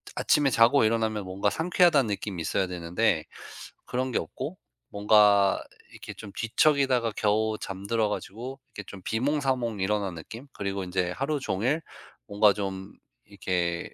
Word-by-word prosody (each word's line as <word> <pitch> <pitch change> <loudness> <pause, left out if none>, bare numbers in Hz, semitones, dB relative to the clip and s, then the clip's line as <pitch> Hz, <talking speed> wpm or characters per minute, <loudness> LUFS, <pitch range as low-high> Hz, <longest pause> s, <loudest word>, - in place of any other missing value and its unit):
아침에 145 -2 +3
자고 115 +3 +5
일어나면 110 -2 0
뭔가 95 +2 -1
상쾌하다는 165 - +3
느낌이 100 -3 -4
있어야 95 +4 0
되는데 90 0 0 0.6
그런 130 +1 -2
게 - - 0
없고 - - -6 0.3
뭔가 105 -1 +4 0.3
이렇게 - - -9
좀 100 - -10
뒤척이다가 125 0 +2
겨우 110 +1 +1
잠들어 100 +3 -2
가지고 120 +6 -6 0.2
이렇게 105 - -7
좀 100 -2 -10
비몽사몽 125 -4 -1
일어난 100 -2 -1
느낌 115 - -10
그리고 100 -1 -3
인제 90 0 -1
하루 140 +8 -2
종일 130 - -1 0.5
뭔가 105 0 +4
좀 95 -1 -5 0.3
이렇게 90 -4 -3
105 Hz, 330 characters per minute, -27 LUFS, 95-125 Hz, 0.6 s, 자고